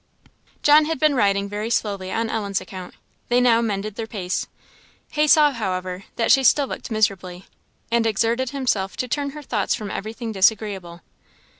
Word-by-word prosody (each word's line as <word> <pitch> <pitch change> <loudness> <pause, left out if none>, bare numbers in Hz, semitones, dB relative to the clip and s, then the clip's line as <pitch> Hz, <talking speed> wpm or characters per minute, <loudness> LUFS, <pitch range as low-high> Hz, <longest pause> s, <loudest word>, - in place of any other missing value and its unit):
John 300 +1 +6
had 320 +1 -2
been 305 0 +3
riding 200 -5 +2
very 210 +2 -4
slowly 200 -5 -1
on 230 0 -1
Ellen's 200 -4 -2
account; 185 -2 -9 0.3
they 245 +1 +4
now 235 -2 +4
mended 215 -2 -2
their 220 +2 -5
pace. 185 -5 -3 0.6
He 305 -1 +2
saw, 300 -1 +6
however, 185 -5 -4
that 230 - +1
she 270 +1 +5
still 280 +3 +4
looked 265 - -7
miserably, 195 -4 -1 0.5
and 230 -1 +2
exerted 230 +4 0
himself 245 -8 -1
to 255 - -2
turn 285 +3 -2
her 300 +1 -9
thoughts 215 -7 -1
from 210 -2 -6
everything 225 +2 -5
disagreeable. 195 -4 0
220 Hz, 165 wpm, -22 LUFS, 195-250 Hz, 0.6 s, John